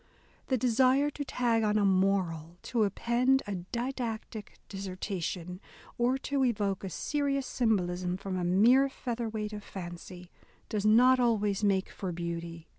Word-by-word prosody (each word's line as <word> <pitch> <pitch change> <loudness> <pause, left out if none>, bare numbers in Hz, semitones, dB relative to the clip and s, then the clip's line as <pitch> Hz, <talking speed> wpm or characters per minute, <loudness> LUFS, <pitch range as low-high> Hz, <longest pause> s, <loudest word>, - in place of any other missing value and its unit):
The 260 - +1
desire 255 +4 +3
to 290 - -5
tag 240 -4 +1
on 210 -1 +2
a 205 - +3
moral 185 -4 +1
— - - -35
to 230 -3 +3
append 245 +6 +1
a 205 - -4 0.2
didactic 235 -3 -4
dissertation," 185 -2 -5 0.3
or 245 +2 +1
to 280 -1 +1
evoke 205 -6 0
a 190 - -3
serious 280 - -1
symbolism 180 -7 0
from 190 0 -5
a 180 - -1
mere 235 +10 +5
featherweight 225 -4 -4
of 210 -1 -6
fancy, 175 -1 -9 0.4
does 210 -1 0
not 250 +4 +6
always 210 -4 +1
make 195 -2 +2
for 190 -2 -5
beauty. 170 -1 -5
210 Hz, 145 wpm, -30 LUFS, 185-245 Hz, 0.4 s, not